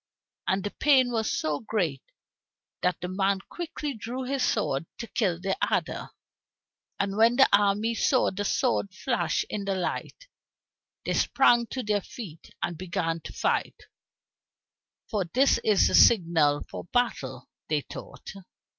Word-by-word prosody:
And 190 0 +1
the 205 - -3
pain 265 -4 +3
was 220 -2 0
so 150 -2 -1
great, 180 - -2 0.8
that 180 0 0
the 180 - -3
man 195 +1 +1
quickly 310 -4 -5
drew 245 +3 -5
his 270 +1 -2
sword 165 - 0
to - - -5
kill 190 -7 -1
the 190 +1 -1 0.2
adder. - - -1 0.9
And 200 0 -1
when 230 +2 +5
the 265 - +6
armies 205 +3 +2
saw 260 - +3
the 200 +2 -3
sword 205 -3 0
flash 240 +1 -1
in 205 - -4
the 195 -1 0
light, 345 - -4 0.8
they - - 0
sprang 240 -3 +3
to 255 +2 -4
their 210 -1 0
feet 180 -7 -10
and 170 -2 -3
began 165 -2 -2
to - - -9
fight, - - -1 1.3
"for 205 -5 -1
this 260 +11 +3
is 210 -3 +3
the - - -2
signal 165 -8 +5
for - - -8
battle," 245 +5 -2 0.2
they - - +1
thought. - - -10
205 Hz, 145 wpm, -27 LUFS, 180-245 Hz, 1.3 s, the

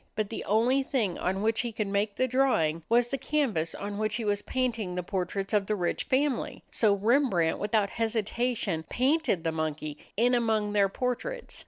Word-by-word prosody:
But 215 -1 -2
the 225 - -4
only 240 +6 +3
thing 230 -9 -1
on 190 +2 -1
which 225 +1 +2
he 240 -1 -3
could 215 -1 -2
make 200 +1 -1
the 255 - +1
drawing 230 -12 +2
was 240 +1 +3
the 275 - -2
canvas 250 - 0
on 205 0 -5
which 215 -1 0
he 230 -1 -2
was 205 -1 0
painting 230 -7 -2
the 180 - -2
portraits 195 +2 -3
of 205 -2 +2
the 215 - +1
rich 175 -3 -1
family. 270 -1 0
So 210 -3 +3
Rembrandt, 205 - +2
without 205 -1 +1
hesitation, 225 -4 -1
painted 265 - +1
the 165 - 0
monkey 155 -1 -3 0.2
in 245 +3 +3
among 220 -3 +1
their 200 -1 +3
portraits. 255 - -3
215 Hz, 185 wpm, -28 LUFS, 195-245 Hz, 0.2 s, only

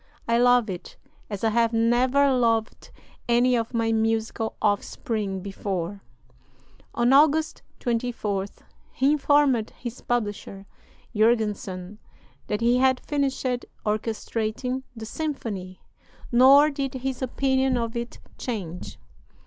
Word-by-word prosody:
"I 235 0 +3
love 245 -1 +4
it 180 -3 -7 0.3
as 205 -1 -5
I 225 - +3
have 230 +1 +2
never 250 +5 +3
loved 230 -3 0 0.4
any 245 +1 +4
of 230 -1 -1
my 230 -2 0
musical 225 0 -1
offspring 205 -1 -1
before." 195 -1 -4 0.9
On 240 +2 +3
August 310 +2 +4 0.2
24th 225 -5 -2 0.3
he 270 +2 +2
informed 285 -6 +3
his 240 0 -7
publisher, 205 -4 -3 0.5
Jurgenson, 210 -3 0 0.5
that 210 +1 -2
he 240 +2 +3
had 260 -1 +3
finished 280 -3 -2 0.4
orchestrating 220 +3 -2
the 225 -1 -7
symphony; 215 -10 -5 0.5
nor 275 +5 +7
did 275 -2 -3
his 260 0 -4
opinion 265 0 +1
of 230 0 -3
it 235 0 -5 0.2
change. 185 -8 -5
235 Hz, 110 wpm, -25 LUFS, 215-260 Hz, 0.9 s, nor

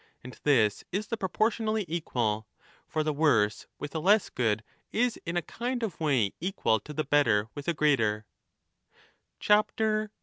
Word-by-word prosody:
And 125 0 -9
this 115 -8 +3
is 200 +4 -2
the 230 - 0
proportionally 215 +1 0
equal. 120 -10 -1 0.4
For 155 - -1
the 155 0 0
worse 120 -9 +2
with 145 - -7
a 160 - -1
less 200 +6 +3
good 110 -3 0 0.3
is 240 +1 0
in 170 +1 -1
a 175 - 0
kind 245 +5 -3
of 215 -6 -4
way 130 -11 +1
equal 170 - +1
to 150 - -11
the 155 - 0
better 120 -8 +2
with 145 -1 -8
a 170 - +2
greater. 115 -9 +2
150 Hz, 155 wpm, -28 LUFS, -, 0.4 s, this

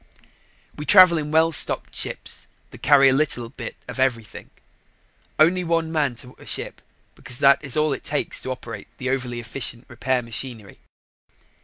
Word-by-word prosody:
We 150 - -8
travel 185 -4 +7
in 150 -1 -5
well 160 +1 +3
stocked - - +3
ships - - -2 0.2
that - - -14
carry 140 -1 +5
a 130 - +5
little 130 -5 0
bit 130 - -8
of - - -8
everything; 120 -4 -2 0.9
only 175 +4 +3
one 165 -1 -1
man 145 -6 0
to 125 +2 -12
a - - -14
ship - - -3 0.3
because 125 0 -3
that 140 +2 +4
is 140 0 -1
all 150 -1 +2
it - - -7
takes 145 0 -2
to - - -6
operate 115 -5 -7
the 130 0 -3
overly 125 -3 -3
efficient 120 0 -4
repair 125 +1 -2
machinery. 115 -2 -5
135 Hz, 165 wpm, -22 LUFS, 120-155 Hz, 0.9 s, travel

